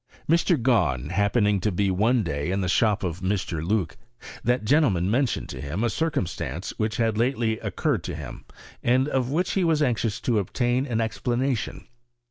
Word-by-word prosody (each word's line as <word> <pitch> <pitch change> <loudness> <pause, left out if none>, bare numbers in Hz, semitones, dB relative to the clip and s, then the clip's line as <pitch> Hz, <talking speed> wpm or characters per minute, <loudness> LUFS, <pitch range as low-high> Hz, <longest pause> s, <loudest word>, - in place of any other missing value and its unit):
Mr. 170 0 +3
Gahn 90 - +1
happening 100 +1 +2
to 105 +3 0
be 95 +1 +1
one 110 +5 +2
day 70 0 -2
in 95 +2 0
the 90 - -1
shop 105 +2 +2
of 90 -1 -3
Mr. 95 -4 -2
Loock, 95 -1 -1 0.5
that 125 -2 +1
gentleman 105 - +3
mentioned 130 +1 0
to 65 - -6
him 75 - -3
a 120 - +1
circumstance 155 - -2
which 110 0 -1
bad 115 -2 +1
lately 115 -3 +1
occurred 140 - -1
to 90 - -4
him, 75 -5 -8 0.4
and 130 +3 +2
of 130 -4 0
which 170 +6 0
he 190 - +1
was 160 -3 +2
anxious 115 -5 0
to 115 -4 +1
obtain 120 +7 0
an 115 -3 0
explanation. 120 +2 -2
110 Hz, 175 wpm, -25 LUFS, 95-125 Hz, 0.5 s, Mr